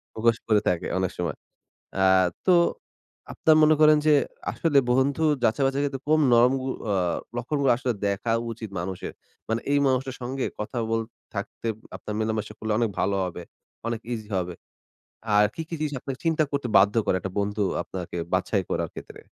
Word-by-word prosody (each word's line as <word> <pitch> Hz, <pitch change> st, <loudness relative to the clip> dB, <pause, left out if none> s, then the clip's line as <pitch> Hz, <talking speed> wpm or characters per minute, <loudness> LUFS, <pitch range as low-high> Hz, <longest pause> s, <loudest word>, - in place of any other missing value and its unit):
মুখোশ 115 Hz, +1 st, +2 dB
করে 105 Hz, -2 st, +4 dB
থাকে 90 Hz, -2 st, -1 dB
অনেক 95 Hz, 0 st, 0 dB
সময়। 85 Hz, -2 st, -2 dB, 0.6 s
আ -, -, +3 dB, 0.4 s
তো 185 Hz, -, +6 dB, 0.8 s
আপনার 155 Hz, -1 st, +4 dB
মনে 155 Hz, +1 st, +6 dB
করেন 155 Hz, 0 st, +7 dB
যে, 155 Hz, -, +6 dB, 0.4 s
আসলে 155 Hz, -4 st, +2 dB
বন্ধু 135 Hz, +5 st, +2 dB, 0.2 s
যাচাই-বাছাই 135 Hz, +4 st, +2 dB
এর -, -, +1 dB
ক্ষেত্রে 135 Hz, -2 st, -3 dB
কোন 155 Hz, 0 st, +4 dB
নম 120 Hz, +1 st, +6 dB, 0.4 s
আ -, -, +2 dB, 0.4 s
লক্ষণগুলো 135 Hz, +2 st, 0 dB
আসলে 125 Hz, -1 st, -1 dB
দেখা 100 Hz, +3 st, 0 dB, 0.2 s
উচিত 110 Hz, -1 st, -7 dB
মানুষের? 90 Hz, +1 st, -4 dB, 0.4 s
মানে 115 Hz, +1 st, 0 dB
এই 145 Hz, -, +4 dB
মানুষটার 130 Hz, 0 st, 0 dB
সঙ্গে 130 Hz, +2 st, -2 dB, 0.2 s
কথা 105 Hz, +3 st, -4 dB
বল 115 Hz, -, +1 dB, 0.3 s
থাকতে 100 Hz, +3 st, -5 dB, 0.3 s
আপনার 105 Hz, -, -6 dB
মেলামেশা 110 Hz, -1 st, -2 dB
করলে 110 Hz, -1 st, -2 dB
অনেক 115 Hz, -3 st, +1 dB
ভালো 100 Hz, +1 st, +1 dB
হবে। 90 Hz, -1 st, -5 dB, 0.4 s
অনেক 115 Hz, -1 st, -2 dB
ইজি 110 Hz, -3 st, -5 dB
হবে। 90 Hz, -1 st, -2 dB, 0.8 s
আর 105 Hz, 0 st, +6 dB
কি, 165 Hz, -, -4 dB
কি 165 Hz, -, -3 dB
জিনিস 150 Hz, -2 st, -2 dB
আপনাকে 135 Hz, 0 st, -5 dB
চিন্তা 160 Hz, -1 st, +3 dB
করতে 140 Hz, -3 st, -1 dB
বাধ্য 100 Hz, +2 st, +4 dB
করে -, -, +2 dB
১ -, -, -19 dB
টা -, -, -9 dB
বন্ধু 105 Hz, +1 st, 0 dB, 0.2 s
আপনাকে 90 Hz, -2 st, -6 dB, 0.2 s
বাছাই -, -, +1 dB
করার -, -, -1 dB
ক্ষেত্রে? -, -, -10 dB
115 Hz, 175 wpm, -25 LUFS, 105-135 Hz, 0.8 s, করেন